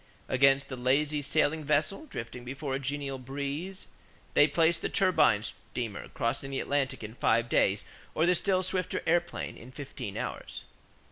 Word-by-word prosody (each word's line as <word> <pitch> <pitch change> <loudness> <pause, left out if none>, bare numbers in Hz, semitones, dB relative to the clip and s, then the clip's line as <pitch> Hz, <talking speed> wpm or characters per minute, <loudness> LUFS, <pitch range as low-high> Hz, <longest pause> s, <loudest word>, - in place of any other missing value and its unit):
Against 135 +1 +4
the 130 - -5
lazy 145 +4 +1
sailing 155 +2 +1
vessel 155 - 0
drifting 120 - -6
before 135 +2 -4
a 135 - 0
genial 140 0 -3
breeze, 140 +8 -5 0.5
they 145 - +6
place 165 +2 +3
the - - -2
turbine 180 - +4
steamer 115 -2 -5
crossing 135 -1 -2
the 135 - -2
Atlantic 140 -4 -1
in 105 +1 -6
five 115 -1 +2
days 100 -3 +2 0.3
or 160 - +3
the 180 - +5
still 185 +1 +2
swifter 185 0 -1
airplane, 175 +1 0
in 120 +3 -12
fifteen 130 -7 -6
hours. - - -5
140 Hz, 155 wpm, -30 LUFS, 130-160 Hz, 0.5 s, they